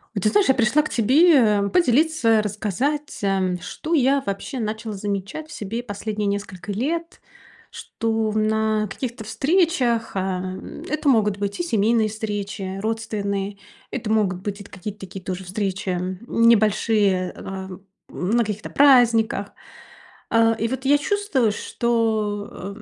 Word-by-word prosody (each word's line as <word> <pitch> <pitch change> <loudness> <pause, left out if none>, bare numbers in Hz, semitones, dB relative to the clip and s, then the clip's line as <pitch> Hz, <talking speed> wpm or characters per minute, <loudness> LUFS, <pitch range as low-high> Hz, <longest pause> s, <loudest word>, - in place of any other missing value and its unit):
Вот - - -2
ты - - +4
знаешь, 410 -7 +3
я 265 - +5
пришла 255 +5 +3
к 305 - -5
тебе, 280 +8 +5
а, 205 -2 +2
поделиться, 290 -7 +3
рассказать, 220 - -2
ам, 190 -2 +1
что 325 +2 -5
я 275 -1 +3
вообще 200 +7 -4
начала 220 0 -3
замечать 200 +9 -4
в - - -9
себе 215 +3 -4
последние 210 -1 -3
несколько 200 -1 -4
лет. 330 - -3 0.5
Что 225 -1 -2
в 215 - -2
на 215 0 +1
каких-то 235 +2 -5
встречах- 265 - +1
ам, 185 -1 -4
это 305 0 -2
могут 210 -6 +3
быть 200 0 -3
и - - -1
семейные 225 -6 +2
встречи, 205 -3 -4
родственные. 205 -3 -2 0.3
Это 235 -4 -4
могут 195 -4 +1
быть 200 +1 -4
это 200 - -11
какие-то 205 +2 -7
такие 190 -1 -9
тоже 185 0 -5
встречи, 195 +1 -3
м, 180 +1 -3
небольшие, 215 -4 +3
э, - - -14
а, 190 -1 -6 0.4
на 225 +6 0
каких-то 215 0 -5
праздниках. 235 -7 +4 0.8
А, 230 0 +4
и 225 0 -1
вот 260 +2 -4
я 285 +2 +5
чувствую, 290 - +1
что, 210 -4 -2
215 Hz, 145 wpm, -22 LUFS, 200-245 Hz, 0.8 s, я